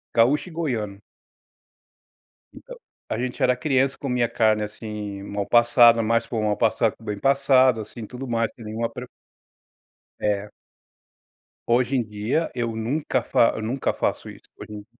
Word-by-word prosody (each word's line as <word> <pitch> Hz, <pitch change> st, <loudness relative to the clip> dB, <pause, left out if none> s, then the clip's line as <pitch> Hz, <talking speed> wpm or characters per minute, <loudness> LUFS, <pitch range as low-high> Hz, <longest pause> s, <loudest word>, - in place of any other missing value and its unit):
gaúcho 135 Hz, +9 st, +3 dB
e -, -, -13 dB
goiano. 115 Hz, -12 st, -3 dB, 1.6 s
Então, -, -, -11 dB, 0.3 s
a -, -, -2 dB
gente 125 Hz, +1 st, -3 dB
era 125 Hz, 0 st, +3 dB
criança, 135 Hz, 0 st, +1 dB
comia 125 Hz, -3 st, 0 dB
carne 110 Hz, -2 st, +2 dB
assim 105 Hz, -1 st, -6 dB
mal 100 Hz, 0 st, -3 dB
passada, 120 Hz, 0 st, +5 dB
mais 115 Hz, +1 st, +1 dB
para 115 Hz, -, -4 dB
o 110 Hz, -, -1 dB
mal 105 Hz, -1 st, +1 dB
passado 115 Hz, -1 st, +2 dB
do -, -, -22 dB
que -, -, -19 dB
bem 105 Hz, -2 st, -4 dB
passado, 135 Hz, -3 st, +3 dB
assim, 110 Hz, +1 st, -8 dB
tudo 125 Hz, +3 st, -8 dB
mais, 115 Hz, -1 st, 0 dB
sem 115 Hz, -, -12 dB
nenhuma 110 Hz, +2 st, -3 dB
preo 125 Hz, +2 st, -8 dB, 1.1 s
É. 105 Hz, 0 st, -1 dB, 1.2 s
Hoje 125 Hz, +3 st, +2 dB
em 125 Hz, -, +2 dB
dia 110 Hz, +9 st, -2 dB
eu 120 Hz, -2 st, -2 dB
nunca 130 Hz, +3 st, -1 dB
fa 115 Hz, -1 st, +2 dB
nunca 125 Hz, +5 st, -1 dB
faço -, -, -2 dB
isso -, -, -12 dB
hoje -, -, -10 dB
em 105 Hz, -, -7 dB
d -, -, -27 dB
115 Hz, 165 wpm, -23 LUFS, 110-130 Hz, 1.6 s, passada